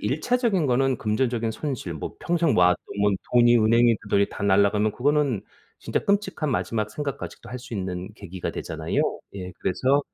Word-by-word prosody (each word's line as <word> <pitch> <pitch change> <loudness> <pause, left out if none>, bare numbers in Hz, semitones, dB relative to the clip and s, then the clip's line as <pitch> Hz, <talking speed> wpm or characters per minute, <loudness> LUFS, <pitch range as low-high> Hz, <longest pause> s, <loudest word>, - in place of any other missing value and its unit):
일차적인 235 - +1
거는 135 +1 +2
금전적인 115 +1 0
손실 125 - -4
뭐 75 - -6
평생 170 -2 +1
모아놓은 90 0 +5 0.6
돈이 120 -1 +6
은행이 115 +1 +4
그 105 - -13
돈이 100 0 +3
다 - - -8
날아가면 100 +2 +3
그거는 140 -4 +1 0.4
진짜 - - -1
끔찍한 200 -6 0
마지막 110 -4 -1
생각까지도 140 +3 -6
할 125 - -5
수 125 -1 -9
있는 95 -1 -4
계기가 95 -4 -6
되잖아요. - - -2 0.3
예. 90 -2 -6
그래서 130 +9 +2
120 Hz, 375 characters per minute, -25 LUFS, 100-140 Hz, 0.6 s, 돈이